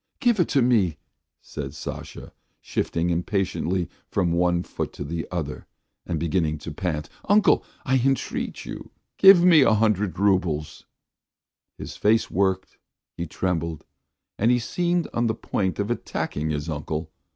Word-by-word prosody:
"Give 240 -6 +2
it 175 - +3
to 135 - +3
me," 100 -10 +2 0.5
said 70 -1 -6
Sasha, - - -8 0.3
shifting 85 +1 -1
impatiently 90 0 -1 0.2
from 90 -4 +1
one 85 0 +2
foot - - -5
to - - -6
the 80 +3 -4
other 80 -5 -4 0.4
and 80 - -1
beginning 80 -1 0
to 75 - -7
pant. 75 -2 -3 0.2
"Uncle, 205 +1 +5 0.2
I 130 -1 +2
entreat 135 0 -1
you, - - -8 0.3
give 195 -2 +9
me 170 -4 +7
a 110 - +5
hundred 105 -4 +1
roubles." 90 -6 0 0.9
His - - -8
face 110 +2 +2
worked; 95 0 0 0.4
he 85 - -4
trembled, 85 -2 -2 0.5
and 120 +4 +3
seemed 175 +7 0
on 120 0 +1
the 110 - 0
point 95 -4 -2
of 105 +3 -1
attacking 80 -9 -3
his 75 0 -2
uncle. 75 +1 -4
95 Hz, 140 wpm, -24 LUFS, 80-115 Hz, 0.9 s, give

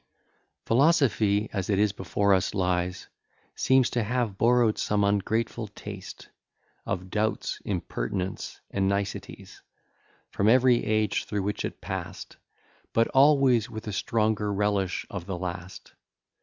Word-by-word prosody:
IX - - -44
Philosophy, 115 -7 +3
as 95 -1 -3
it 100 0 +2
before 100 +2 +1
us 95 +2 +1
lies, 90 -1 -1 0.5
Seems 130 -1 +3
to 120 - 0
have 115 -1 -1
borrow'd 120 0 +3
some 105 -1 +1
ungrateful 110 +3 0
taste 100 - -10 0.6
Of 95 +1 -3
doubts, 110 +1 -1
impertinence, 90 0 -4
and 95 -1 +1
niceties, 100 0 -4 0.7
From 100 - +2
every 125 0 +5
age 110 0 0
through 105 -2 -2
which 105 +1 -2
it - - -5
pass'd, - - -6 0.6
But 115 0 +3
always 135 -4 +4
with 110 0 -7
a 105 - -4
stronger 105 0 0
relish 100 -2 0
of 95 -2 -6
the 95 -2 -3
last. 90 +1 -7
105 Hz, 130 wpm, -27 LUFS, 95-115 Hz, 0.7 s, every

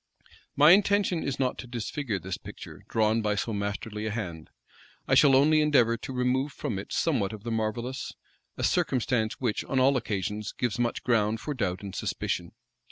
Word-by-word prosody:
My 150 +3 +7
intention 200 -3 +3
is 140 0 -3
not 130 -2 0
to 125 - -7
disfigure 120 -1 -3
this 95 0 -5
picture, - - -10
drawn 110 0 +2
by 105 -1 0
so 110 +3 -2
masterly 105 +1 -3
a - - -1
hand: 90 -8 -5 0.6
I - - +1
shall 140 -3 +6
only 155 +3 +5
endeavor 130 -6 +4
to 115 - -7
remove 130 +2 0
from 115 -10 -3
it 100 - -9
somewhat 115 -11 0
of 105 -2 -9
the 120 - -4
marvellous; 115 +4 -2 0.5
a - - -4
circumstance 120 -4 +1
which, 120 -5 -1
on 135 - 0
all 135 +2 +4
occasions, 105 -2 -3
gives 120 -2 -2
much 120 -1 -1
ground 110 -2 +2
for 150 - -4
doubt 95 -7 -2
and 100 -2 -6
suspicion. - - -3
115 Hz, 180 wpm, -28 LUFS, 105-135 Hz, 0.6 s, My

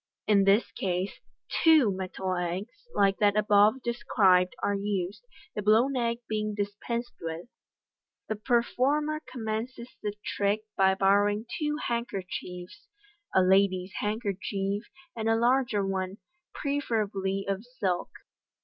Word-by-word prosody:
In 200 -2 +4
this 200 +4 +3
case, 185 +1 -2 0.4
two 310 -10 +6
metal 185 0 -3
eggs, 185 - -4
like 195 -1 +3
that 205 0 +3
above 210 +4 +4
described, 195 -6 +3
are 205 - +2
used, 200 - -2 0.3
the 210 - -3
blown 225 +6 +4
egg 235 -1 0
being 215 -1 -2
dis 205 -1 -2
pensed 235 0 -3
with. 165 0 -5 0.8
The 215 - -1
performer 270 +6 +1
commences 235 +1 -4
the 205 -1 -3
trick 205 +1 0
by 190 -1 +4
borrowing 205 +2 +3
two 300 -1 0
handkerchiefs, 185 -6 -5 0.5
a 190 - +6
lady's 190 0 +3
handkerchief, 200 -1 -2 0.3
and 225 -1 -1
a 225 - +4
larger 235 -3 +2
one, 190 0 -2 0.3
preferably 210 -9 -1
of 195 +1 -2
silk. 215 -8 -2
205 Hz, 120 wpm, -28 LUFS, 195-235 Hz, 0.8 s, two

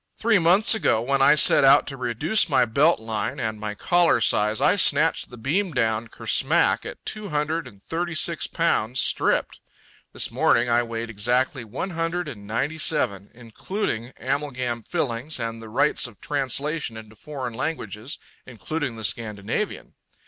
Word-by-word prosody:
Three 225 -3 +2
months 180 +8 +5
ago, 215 - +2
when 135 +4 0
I 135 - +6
set 145 - +5
out 135 +1 +6
to 140 - -6
reduce 135 - 0
my 135 - +3
belt 140 +9 +2
line 110 -2 -4
and 110 -2 -3
my 105 -1 -5
collar 175 - +2
size, 105 -1 +2
I 180 - +3
snatched 160 -4 +3
the 125 - -11
beam 165 - -1
down 115 -2 0
ker - - -13
smack - - +2
at - - -10
two 215 -2 -5
hundred 155 +2 -2
and 100 -1 -16
thirty 170 0 -3
six 165 +1 0
pounds, 130 -8 0
stripped. - - +1 0.5
This - - -1
morning - - +2
I 120 0 +3
weighed 115 0 -5
exactly 125 +5 0
one 115 - -5
hundred 165 +1 -2
and 105 -8 -8
ninety 140 +9 -2
seven, 100 - 0
including 120 - -4
amalgam 130 -3 -3
fillings 135 0 -3
and 115 -1 -4
the 110 - -10
rights 125 +4 +2
of 115 -5 -16
translation 140 -2 -1
into 110 -1 -12
foreign 130 -3 -7
languages, 120 - -4 0.3
including 130 +2 -4
the 110 - -8
Scandinavian. 110 - -3
130 Hz, 165 wpm, -24 LUFS, 115-160 Hz, 0.5 s, I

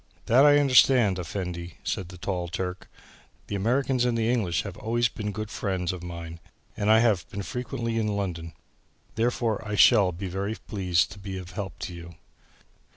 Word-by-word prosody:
"That 130 +5 +6
I 145 0 +7
understand, 130 -7 +5
Effendi," 90 -1 -5
said 90 -2 -3
the 90 - -10
tall 90 -1 -3
Turk; 90 +1 -5 0.6
"the - - -7
Americans 125 +5 +1
and 120 -1 +1
the 115 +1 +1
English 90 -8 0
have 100 -3 -7
always 120 +2 +1
been 105 -1 -4
good 110 +1 -5
friends 95 -3 -2
of 90 - -7
mine 85 -1 -7 0.4
and 105 - 0
I 110 +1 +6
have 100 -9 +1
been 100 - -5
frequently 120 -1 -3
in 110 - 0
London. 85 -4 -4 0.6
Therefore, 115 -1 0
I 105 -1 -3
shall 105 -3 +6
be 90 +3 -5
very 100 +4 -3
pleased 90 -6 0
to 100 - -10
be 95 -1 -6
of 90 -1 -8
any 90 - -14
help 100 -3 -5
to 90 - -5
you." 85 0 -10
100 Hz, 185 wpm, -26 LUFS, 90-115 Hz, 0.6 s, I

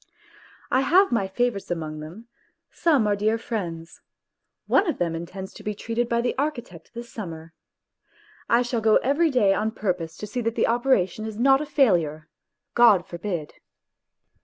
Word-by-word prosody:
I 260 - +3
have 360 +5 +4
my 200 -5 +1
favourites 215 +1 -1
among 155 -3 -4
them, 175 +10 -10 0.4
some 295 -10 +2
are 205 -1 +2
dear 215 +2 +1
friends; 170 -8 -6 0.6
one 395 - +3
of - - -2
them 170 -2 -1
intends 180 +3 -7
to - - -12
be 210 0 -3
treated 230 +3 -2
by 235 0 +1
the 245 - -1
architect 240 - -4
this 235 0 -8
summer. 165 -6 -8 1.0
I 235 +1 +4
shall 240 -2 -2
go 220 -1 +4
every 290 +6 +2
day 225 -8 +3
on 215 +2 0
purpose 180 -7 -3
to - - -6
see 245 +4 -4
that 230 0 -2
the - - +2
operation 230 -4 +1
is 215 -1 -7
not 270 +3 +4
a 300 - -5
failure. 170 - +1 0.4
God 215 -7 +5
forbid 170 -3 -5
220 Hz, 165 wpm, -24 LUFS, 175-245 Hz, 1.0 s, God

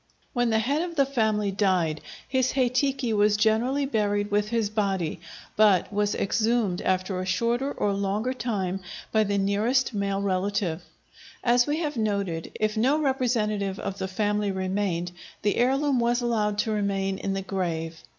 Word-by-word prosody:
When 245 -3 +1
the 220 - +2
head 275 +8 +1
of 345 -1 -4
the 280 -3 +4
family 220 -6 0
died, 185 -6 +1 0.3
his 260 -1 +1
hei 255 -2 +2
tiki 260 -1 0
was 210 0 +3
generally 235 +6 +2
buried 205 -4 0
with 205 0 +1
his 230 -2 +1
body, 195 -7 -1 0.4
but 205 -2 +4
was 205 0 +1
exhumed 220 -2 +1
after 185 0 0
a - - -4
shorter 235 +8 0
or 205 -6 0
longer 200 +5 -1
time 205 -7 -2 0.3
by 220 -1 +3
the 200 0 0
nearest 215 +7 +1
male 200 -1 -1
relative. 190 -3 -1 0.6
As 245 +1 +4
we 295 +1 0
have 300 -5 -2
noted, 200 -7 -1
if 215 0 0
no 260 +7 +2
representative 225 -8 0
of 195 0 -5
the 190 - -2
family 205 +1 0
remained, 185 -2 -1 0.3
the 205 - +1
heirloom 270 +2 +2
was 240 +1 +2
allowed 215 -4 0
to 220 - -2
remain 195 -2 -1
in 195 - -2
the 195 - -3
grave. 165 -4 -3
210 Hz, 165 wpm, -26 LUFS, 195-240 Hz, 0.6 s, the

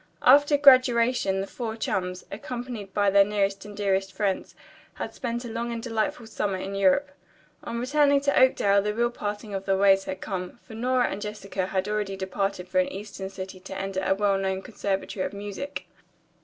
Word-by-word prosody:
After 290 +3 +6
graduation 250 -7 +5
the - - -3
four 225 +1 -5
chums, 185 -4 -2
accompanied 235 -1 -6
by 205 0 +2
their 200 0 +7
nearest 200 -1 -1
and 205 -1 -10
dearest 195 -1 0
friends, 190 0 -2 0.4
had - - -5
spent 240 -1 -4
a - - -4
long 230 +1 -3
and 235 - -3
delightful 235 +2 -2
summer 205 -3 -2
in 190 +1 -5
Europe. 200 +9 +3 0.5
On 235 - -4
returning 285 +3 +3
to 280 0 +1
Oakdale 200 -6 +4
the 210 +1 -2
real 240 +1 +1
parting 205 -2 -5
of 195 0 -4
the 195 -1 +2
ways 195 0 +4
had 190 - -5
come, 185 0 -5
for 235 - -13
Nora 250 +2 +1
and 200 - -5
Jessica 200 -3 -4
had 190 0 -1
already 210 -2 -2
departed 190 -1 -2
for 275 - +1
an 275 0 +1
eastern 195 -3 -6
city 190 -1 -8
to 190 +1 -8
enter 195 0 -2
a 190 - +2
well 200 -1 +2
known 190 0 -2
conservatory 200 -4 -3
of - - -4
music. 205 +7 -6
205 Hz, 190 wpm, -26 LUFS, 195-235 Hz, 0.5 s, their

